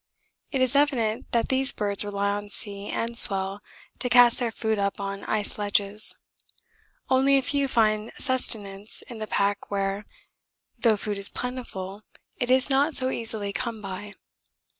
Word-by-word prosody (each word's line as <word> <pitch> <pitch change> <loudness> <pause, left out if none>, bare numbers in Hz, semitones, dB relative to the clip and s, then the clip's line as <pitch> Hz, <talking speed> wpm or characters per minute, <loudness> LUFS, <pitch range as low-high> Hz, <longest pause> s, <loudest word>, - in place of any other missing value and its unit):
It 270 - -1
is 255 +1 +1
evident 250 -7 0
that 235 -1 0
these 265 +1 +3
birds 205 -1 -2
rely 200 0 -2
on 205 0 -5
sea 200 0 -4
and 235 0 -3
swell 195 0 +4 0.4
to 250 - 0
cast 245 0 +5
their 240 -2 -1
food 220 -2 -2
up 200 0 -2
on 195 0 -5
ice 210 -1 -2
ledges 205 0 +5 0.9
only 270 +1 +4
a 270 - 0
few 280 +1 0
find 215 -3 +1
sustenance 210 -6 -2
in 235 -3 -11
the 215 - -5
pack 200 -1 -1
where, 200 0 -3 0.7
though 225 -3 +3
food 205 0 -4
is 200 - +8
plentiful, 215 -6 -6 0.4
it 245 - -2
is 260 0 +3
not 285 +2 +1
so 260 0 +1
easily 220 -3 -3
come 230 -1 -4
by. 205 +1 -8
215 Hz, 160 wpm, -25 LUFS, 200-250 Hz, 0.9 s, is